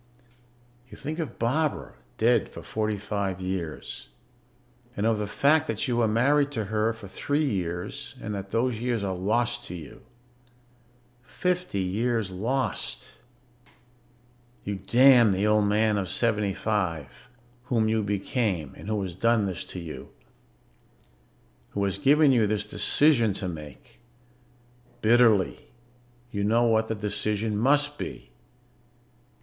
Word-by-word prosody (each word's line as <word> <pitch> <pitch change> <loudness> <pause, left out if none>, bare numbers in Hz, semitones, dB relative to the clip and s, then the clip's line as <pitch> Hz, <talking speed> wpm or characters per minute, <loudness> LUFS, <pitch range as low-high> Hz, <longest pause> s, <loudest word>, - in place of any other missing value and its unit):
You - - -12
think 155 +4 -5
of 160 - -4
Barbara 145 +6 -1 0.2
dead - - +3
for - - -10
forty 110 -1 -2
five 100 -2 -3
years. 90 -8 -5 0.9
And 100 - 0
of 115 -1 +2
the 105 - -2
fact 150 +8 +3
that 150 - -2
you 120 -2 0
were 115 -2 +3
married 140 +6 +2
to 110 -4 -2
her 110 +1 +2
for 110 -3 -10
three 145 +10 -1
years 90 -7 -4
and 105 - -5
that 100 -1 -5
those 115 0 0
years 120 -4 -1
are 95 -1 -1
lost 120 +6 0
to 90 - -7
you. 80 -5 -10 1.2
Fifty 175 - -2
years 110 +2 -1
lost. 120 +8 -3 1.4
You 100 0 -3
damn 120 +2 +6
the 95 +2 0
old 105 -1 +3
man 105 0 +2
of 95 - -3
seventy 105 -5 0
five 90 - -3 0.4
whom 115 -3 +1
you 110 0 +1
became 100 - -1
and - - -11
who 105 -2 -1
has 90 -2 -5
done 115 +3 +2
this 95 -3 -3
to 90 - -7
you... 80 -6 -8 1.6
who 100 - -1
has 100 0 -1
given 145 +3 +5
you 115 -5 +3
this 105 0 -1
decision 120 -1 +3
to 95 - -4
make. 75 -5 -9 1.0
Bitterly, 110 -3 +3 0.6
you 100 -1 -2
know 115 +3 +3
what 110 -1 +2
the 110 - -2
decision 105 +1 -1
must 145 +6 +2
be. - - -7
110 Hz, 135 wpm, -26 LUFS, 100-120 Hz, 1.6 s, damn